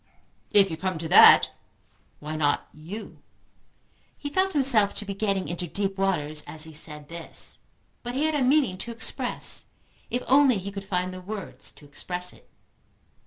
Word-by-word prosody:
"If 195 -3 +4
you 160 - -4
come 185 0 -3
to 160 +1 -5
that, - - +8 0.7
why 155 +1 -6
not 150 -2 0
you?" 180 +9 -10 1.0
He 285 - -6
felt 380 +4 +1
himself 250 -8 +6
to 210 - -2
be 200 - -4
getting 195 -3 -1
into 175 +2 -4
deep 195 +3 -2
waters 155 -6 0
as 155 -1 -3
he 160 0 -9
said 150 -1 -5
this, 170 0 -8 0.4
but 245 +1 -6
he 280 - 0
had 315 - 0
a 295 - 0
meaning 255 -8 +2
to 235 - -6
express 235 +2 0 0.4
if 245 - -2
only 270 -3 +4
he 195 +1 -6
could 195 0 -7
find 185 -1 -2
the 185 - -8
words 205 +1 -7
to 150 - -17
express 180 +5 -4
it. - - -22
195 Hz, 170 wpm, -25 LUFS, 165-235 Hz, 1.0 s, that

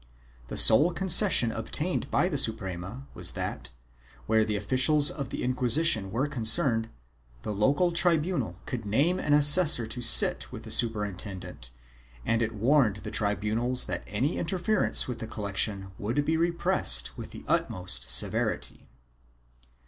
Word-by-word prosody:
The - - -7
sole 150 +11 +8
concession 180 - +4
obtained 150 +11 -5
by 180 - 0
the 150 -7 0
Suprema 105 +1 -2
wras - - -3
that, - - -6 0.6
where 110 0 +1
officials 130 +8 +1
of 140 -4 -7
the - - -6
Inquisition 125 -3 +3
were 130 +7 -2
concerned, 115 -2 +1 0.5
the 105 - -5
local 140 - 0
tribunal 175 0 -1
could 125 -5 -6
name 140 - -1
an 145 - -1
assessor 145 -3 +4
to 110 +3 -5
sit 115 - +3
with 110 - -10
the 110 - -8
superintendent 100 - -4 0.6
and 115 0 -1
it 110 -1 -3
warned 120 -1 +1
the 105 - -8
tribunals 110 +5 -1
that 90 -1 -5
any 125 - -3
interference 185 +4 0
with 125 -2 -7
the 110 - -7
collection 100 -2 -4
would 120 +8 -3
be 160 - -1
repressed 170 +1 0
with - - -10
the - - -13
utmost 90 0 -3
severity. - - -2
120 Hz, 140 wpm, -26 LUFS, 105-150 Hz, 0.6 s, sole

